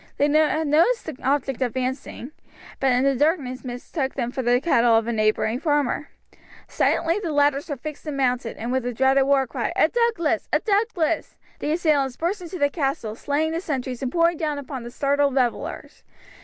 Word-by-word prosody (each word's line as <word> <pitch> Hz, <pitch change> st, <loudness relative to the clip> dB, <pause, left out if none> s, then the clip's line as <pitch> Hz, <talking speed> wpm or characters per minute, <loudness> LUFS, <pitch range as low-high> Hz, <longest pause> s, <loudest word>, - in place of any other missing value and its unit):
They 290 Hz, -, +3 dB
had 310 Hz, +1 st, +2 dB
noticed 335 Hz, +12 st, +3 dB
the 315 Hz, -, -5 dB
objects 270 Hz, -1 st, 0 dB
advancing, 260 Hz, +2 st, -3 dB, 0.5 s
but 270 Hz, -1 st, +2 dB
in 250 Hz, +1 st, +2 dB
the 275 Hz, 0 st, +3 dB
darkness 275 Hz, -3 st, 0 dB
mistook 265 Hz, +3 st, -4 dB
them 245 Hz, -3 st, -2 dB
for 260 Hz, -, -3 dB
the 245 Hz, 0 st, +3 dB
cattle 240 Hz, -6 st, +3 dB
of 225 Hz, -, 0 dB
a 235 Hz, -, -2 dB
neighbouring 215 Hz, +2 st, +1 dB
farmer. 295 Hz, -1 st, 0 dB, 0.6 s
Silently 335 Hz, +4 st, +1 dB
the 350 Hz, -6 st, -3 dB
ladders 290 Hz, +1 st, +2 dB
were 285 Hz, -, -2 dB
fixed 305 Hz, +4 st, -8 dB
and 290 Hz, -2 st, -3 dB
mounted, 250 Hz, -3 st, 0 dB
and 235 Hz, +2 st, -4 dB
with 260 Hz, 0 st, +1 dB
the 245 Hz, 0 st, -3 dB
dreaded 265 Hz, +2 st, +3 dB
war 275 Hz, -1 st, +3 dB
cry, -, -, -3 dB
"A -, -, +4 dB
Douglas! 455 Hz, -10 st, 0 dB
A -, -, +3 dB
Douglas!" 400 Hz, -7 st, 0 dB, 0.2 s
the 295 Hz, -, -2 dB
assailants 295 Hz, -6 st, +1 dB
burst 365 Hz, +5 st, -2 dB
into 360 Hz, +1 st, -7 dB
the 285 Hz, -3 st, +1 dB
castle, 270 Hz, -8 st, -2 dB
slaying 290 Hz, +7 st, -1 dB
the 330 Hz, +1 st, -2 dB
sentries 260 Hz, -6 st, -4 dB
and 260 Hz, -2 st, -2 dB
pouring 335 Hz, +1 st, +2 dB
down 300 Hz, -2 st, -2 dB
upon 275 Hz, -2 st, -6 dB
the 235 Hz, -, -7 dB
startled 280 Hz, +2 st, +1 dB
revellers. 250 Hz, -3 st, -2 dB
280 Hz, 190 wpm, -23 LUFS, 255-315 Hz, 0.6 s, A